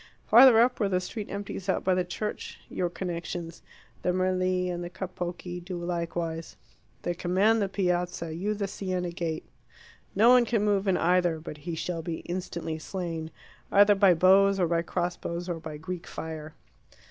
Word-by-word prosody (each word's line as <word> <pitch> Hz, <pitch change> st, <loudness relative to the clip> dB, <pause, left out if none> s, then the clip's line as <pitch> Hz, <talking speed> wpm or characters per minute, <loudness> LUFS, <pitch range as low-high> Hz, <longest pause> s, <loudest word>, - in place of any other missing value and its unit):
Farther 240 Hz, 0 st, +8 dB
up, 245 Hz, +2 st, +3 dB
where 205 Hz, -3 st, +1 dB
the 180 Hz, -1 st, +2 dB
street 205 Hz, +3 st, -6 dB
empties 200 Hz, -1 st, -5 dB
out -, -, +1 dB
by 185 Hz, -, +3 dB
the 180 Hz, 0 st, +1 dB
church, 210 Hz, +4 st, -5 dB
your 180 Hz, -1 st, -1 dB
connections, 170 Hz, -1 st, -5 dB, 0.4 s
the 180 Hz, -, +1 dB
Merli 185 Hz, 0 st, +1 dB
and 175 Hz, -1 st, -3 dB
the 175 Hz, -, -5 dB
Capocchi, 175 Hz, -1 st, -5 dB
do 180 Hz, 0 st, -5 dB
likewise. 170 Hz, -1 st, -3 dB, 0.5 s
They 175 Hz, -, -1 dB
command 190 Hz, +6 st, +2 dB
the 200 Hz, -, 0 dB
Piazza, 180 Hz, -3 st, -1 dB
you 200 Hz, +6 st, -2 dB
the 200 Hz, -1 st, -2 dB
Siena 185 Hz, -3 st, -3 dB
gate. 165 Hz, -2 st, -3 dB, 0.7 s
No 220 Hz, +5 st, +6 dB
one 250 Hz, -1 st, +7 dB
can 225 Hz, -3 st, +1 dB
move 200 Hz, -1 st, +1 dB
in 190 Hz, -, +3 dB
either 175 Hz, -1 st, +2 dB
but 155 Hz, -1 st, -8 dB
he 165 Hz, -, -2 dB
shall 165 Hz, +1 st, -3 dB
be 165 Hz, 0 st, -4 dB
instantly 170 Hz, -3 st, -4 dB
slain, 165 Hz, -2 st, -4 dB, 0.4 s
either 205 Hz, +1 st, +7 dB
by 195 Hz, -3 st, +5 dB
bows 195 Hz, +3 st, +5 dB
or 180 Hz, -, +3 dB
by 165 Hz, 0 st, +1 dB
crossbows, 175 Hz, 0 st, -3 dB
or 170 Hz, -2 st, -3 dB
by 155 Hz, -2 st, -7 dB
Greek 175 Hz, +3 st, -6 dB
fire. 160 Hz, -1 st, -7 dB
180 Hz, 170 wpm, -28 LUFS, 170-195 Hz, 0.7 s, Farther